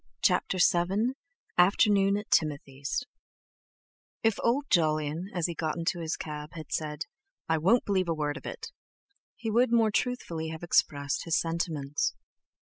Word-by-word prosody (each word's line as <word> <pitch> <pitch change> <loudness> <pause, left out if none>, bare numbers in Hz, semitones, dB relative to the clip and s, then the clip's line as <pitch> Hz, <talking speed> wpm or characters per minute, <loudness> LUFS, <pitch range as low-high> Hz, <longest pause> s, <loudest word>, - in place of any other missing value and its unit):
CHAPTER 190 - +2
VII 190 +7 +2 0.5
AFTERNOON 200 +1 +4
AT 210 - -7
TIMOTHY'S 145 - 0 1.2
If 225 -2 +2
old 260 +5 +2
Jolyon, 155 +1 +1
as 175 -4 -1
he 170 - -1
got 160 0 -2
into 170 +1 -1
his 160 -1 -2
cab, 150 0 -6
had 155 -3 -9
said: 155 0 -2 0.4
"I 160 -1 +2
won't 200 +10 +3
believe 190 -3 +1
a 165 - +1
word 150 -1 -1
of - - -8
it!" - - -7 0.6
he 225 -2 -4
would 235 +2 +3
more 225 -2 +4
truthfully 175 -10 -2
have 160 +1 -7
expressed 145 -4 +1
his 165 -1 +2
sentiments. 160 -4 -1
170 Hz, 145 wpm, -29 LUFS, 155-200 Hz, 1.2 s, AFTERNOON